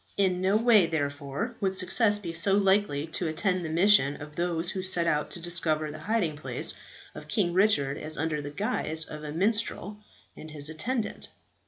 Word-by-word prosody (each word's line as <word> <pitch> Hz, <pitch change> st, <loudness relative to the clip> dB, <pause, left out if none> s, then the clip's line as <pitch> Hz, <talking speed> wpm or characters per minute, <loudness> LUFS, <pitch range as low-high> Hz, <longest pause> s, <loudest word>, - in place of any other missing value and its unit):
In 185 Hz, -2 st, +1 dB
no 195 Hz, +3 st, +2 dB
way, 220 Hz, -6 st, +4 dB
therefore, 145 Hz, -, -3 dB
would 190 Hz, -1 st, 0 dB
success 205 Hz, +3 st, +2 dB
be 175 Hz, -5 st, -7 dB
so 180 Hz, +4 st, +4 dB
likely 195 Hz, -7 st, +1 dB
to 165 Hz, +1 st, -3 dB
attend 180 Hz, +3 st, 0 dB
the 160 Hz, -, -4 dB
mission 165 Hz, -4 st, +3 dB
of 150 Hz, 0 st, -10 dB
those 175 Hz, 0 st, -1 dB
who 190 Hz, -, -4 dB
set 185 Hz, -2 st, +1 dB
out 150 Hz, -2 st, 0 dB
to -, -, -5 dB
discover 165 Hz, -3 st, -2 dB
the 155 Hz, -, -9 dB
hiding 195 Hz, -9 st, 0 dB
place 150 Hz, -, +1 dB, 0.4 s
of -, -, -11 dB
King 180 Hz, -6 st, 0 dB
Richard 175 Hz, -8 st, +2 dB
as 155 Hz, 0 st, -2 dB
under 155 Hz, -1 st, -2 dB
the 145 Hz, -, -6 dB
guise 160 Hz, +2 st, -1 dB
of 150 Hz, 0 st, -9 dB
a 150 Hz, -, -6 dB
minstrel 210 Hz, +2 st, 0 dB, 0.4 s
and 155 Hz, -, -11 dB
his 150 Hz, -1 st, +2 dB
attendant. 220 Hz, +9 st, -2 dB
170 Hz, 185 wpm, -27 LUFS, 155-200 Hz, 0.4 s, way